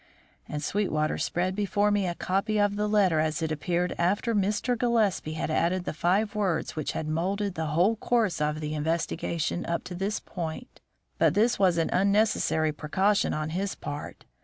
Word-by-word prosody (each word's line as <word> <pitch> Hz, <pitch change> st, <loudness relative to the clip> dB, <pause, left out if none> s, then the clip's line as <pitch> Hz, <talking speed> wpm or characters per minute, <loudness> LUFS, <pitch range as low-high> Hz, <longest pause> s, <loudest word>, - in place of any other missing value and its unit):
And 150 Hz, 0 st, -4 dB
Sweetwater 155 Hz, -5 st, 0 dB
spread 185 Hz, +2 st, 0 dB
before 205 Hz, 0 st, +1 dB
me 205 Hz, -2 st, +1 dB
a 175 Hz, -, -2 dB
copy 200 Hz, +5 st, 0 dB
of 205 Hz, 0 st, +2 dB
the 210 Hz, +1 st, 0 dB
letter 195 Hz, -6 st, +3 dB
as 155 Hz, +1 st, 0 dB
it 160 Hz, -, -1 dB
appeared 175 Hz, +3 st, -1 dB
after 200 Hz, +7 st, +1 dB
Mr. 210 Hz, +4 st, +1 dB
Gillespie 220 Hz, -9 st, +1 dB
had 155 Hz, 0 st, -3 dB
added 175 Hz, +3 st, +1 dB
the -, -, -3 dB
five 190 Hz, +7 st, +1 dB
words 195 Hz, -6 st, -1 dB
which 155 Hz, -3 st, -2 dB
had 155 Hz, -, -3 dB
moulded 190 Hz, +5 st, -1 dB
the 160 Hz, -2 st, -3 dB
whole 175 Hz, +9 st, +2 dB
course 215 Hz, -9 st, +1 dB
of 150 Hz, +1 st, 0 dB
the 150 Hz, 0 st, -3 dB
investigation 165 Hz, +2 st, -1 dB
up 170 Hz, -, -2 dB
to 180 Hz, -, -7 dB
this 195 Hz, +4 st, -2 dB
point. 170 Hz, +7 st, -7 dB, 0.4 s
But -, -, +3 dB
this 225 Hz, +2 st, +3 dB
was 185 Hz, -3 st, +4 dB
an 165 Hz, -, 0 dB
unnecessary 200 Hz, -5 st, +2 dB
precaution 190 Hz, +7 st, +1 dB
on 155 Hz, 0 st, -2 dB
his 190 Hz, +3 st, -2 dB
part. 145 Hz, 0 st, -7 dB
180 Hz, 180 wpm, -27 LUFS, 160-205 Hz, 0.4 s, was